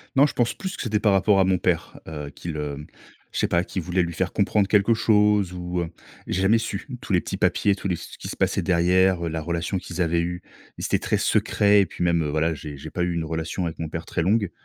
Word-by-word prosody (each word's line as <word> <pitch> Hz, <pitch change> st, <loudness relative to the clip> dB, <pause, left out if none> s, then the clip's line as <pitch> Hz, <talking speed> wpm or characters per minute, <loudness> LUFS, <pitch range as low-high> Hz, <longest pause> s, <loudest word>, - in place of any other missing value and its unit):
Non, 140 Hz, +2 st, +6 dB
je -, -, -6 dB
pense 120 Hz, -1 st, +1 dB
plus 190 Hz, 0 st, -5 dB
que -, -, -4 dB
c'était 110 Hz, -4 st, 0 dB
par 105 Hz, 0 st, +3 dB
rapport 100 Hz, +1 st, +4 dB
à 95 Hz, -, +6 dB
mon 95 Hz, 0 st, +2 dB
père, 85 Hz, -2 st, -1 dB
heu, 75 Hz, -2 st, -6 dB
qu'ils 80 Hz, +2 st, -7 dB
heu, 75 Hz, 0 st, -4 dB, 0.5 s
je -, -, -3 dB
sais -, -, +2 dB
pas, 85 Hz, 0 st, +2 dB
qu'ils 95 Hz, 0 st, -4 dB
voulaient 90 Hz, +2 st, 0 dB
lui 85 Hz, -, -4 dB
faire 90 Hz, +2 st, -1 dB
comprendre 100 Hz, 0 st, +2 dB
quelque 105 Hz, +3 st, +4 dB
chose 105 Hz, -4 st, +3 dB
ou, 90 Hz, 0 st, -3 dB
heu, 85 Hz, -, -3 dB, 0.4 s
j'ai 95 Hz, -, -1 dB
jamais 110 Hz, +4 st, +4 dB
su 105 Hz, +4 st, -4 dB
tous 120 Hz, -, -3 dB
les 90 Hz, -, +4 dB
petits -, -, -5 dB
papiers, 100 Hz, -, +2 dB
tous 95 Hz, 0 st, -4 dB
les 90 Hz, -, 0 dB
ce -, -, -10 dB
qui -, -, -7 dB
se -, -, -5 dB
passait -, -, +1 dB
derrière, 90 Hz, 0 st, +3 dB
heu, -, -, -1 dB
la 80 Hz, 0 st, -3 dB
relation 85 Hz, +3 st, -2 dB
qu'ils 90 Hz, 0 st, -5 dB
avaient 85 Hz, +1 st, +1 dB
eue, 90 Hz, +1 st, -4 dB, 0.3 s
ils -, -, -4 dB
étaient -, -, +1 dB
très -, -, 0 dB
secrets. 100 Hz, 0 st, +3 dB
Et -, -, +2 dB
puis -, -, -5 dB
même, 85 Hz, -1 st, +2 dB
heu, 75 Hz, -, -1 dB
voilà, 80 Hz, +2 st, +1 dB
j'ai 75 Hz, -1 st, -8 dB
j'ai 75 Hz, +3 st, -9 dB
pas 90 Hz, -, -3 dB
eu 90 Hz, 0 st, 0 dB
une 80 Hz, -, -1 dB
relation 80 Hz, +3 st, -3 dB
avec 80 Hz, 0 st, -5 dB
mon 80 Hz, -1 st, -3 dB
père 80 Hz, +1 st, -5 dB
très 85 Hz, -, -2 dB
longue. 100 Hz, +2 st, +1 dB
90 Hz, 270 wpm, -24 LUFS, 80-100 Hz, 0.5 s, Non